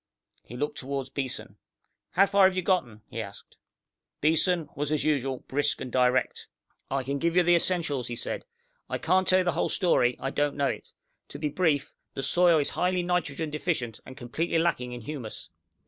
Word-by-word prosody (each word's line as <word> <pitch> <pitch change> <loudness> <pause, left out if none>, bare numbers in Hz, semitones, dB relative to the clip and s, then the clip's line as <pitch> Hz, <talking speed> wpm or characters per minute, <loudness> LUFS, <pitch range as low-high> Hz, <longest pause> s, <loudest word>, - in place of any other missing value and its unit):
He 120 - -9
looked 150 +3 -2
toward 135 0 -4
Beeson. 135 -3 -4 0.6
"How 195 +3 +6
far 200 -1 +5
have 190 - -2
you 185 - 0
gotten?" 130 - 0
he - - -5
asked. - - -10 0.6
Beeson 160 +2 +2
was, 145 +1 -2
as 155 - +1
usual, 135 -4 0
brisk 145 +2 0
and 125 - -6
direct. 125 0 +1 0.4
"I 135 0 -1
can 140 +2 -2
give 170 +2 0
you 180 - +6
the 175 +1 +4
essentials," 160 -8 0
he 120 - -4
said. - - -3 0.5
"I - - -1
can't 185 0 +2
tell 185 - +5
you - - -3
the 175 - +3
whole - - 0
story. 125 -10 +3
I 135 - -2
don't 145 0 0
know 140 -1 +2
it. - - -6 0.4
To - - -8
be 150 0 -1
brief, 145 -3 +1 0.2
the 135 - -3
soil 175 +4 +5
is 145 - +1
highly 180 0 0
nitrogen 165 -3 -1
deficient, 150 -8 -2
and 130 - -11
completely 165 +8 -1
lacking 145 -7 0
in 120 0 -6
humus. 120 -3 -6
145 Hz, 195 wpm, -27 LUFS, 130-175 Hz, 0.6 s, How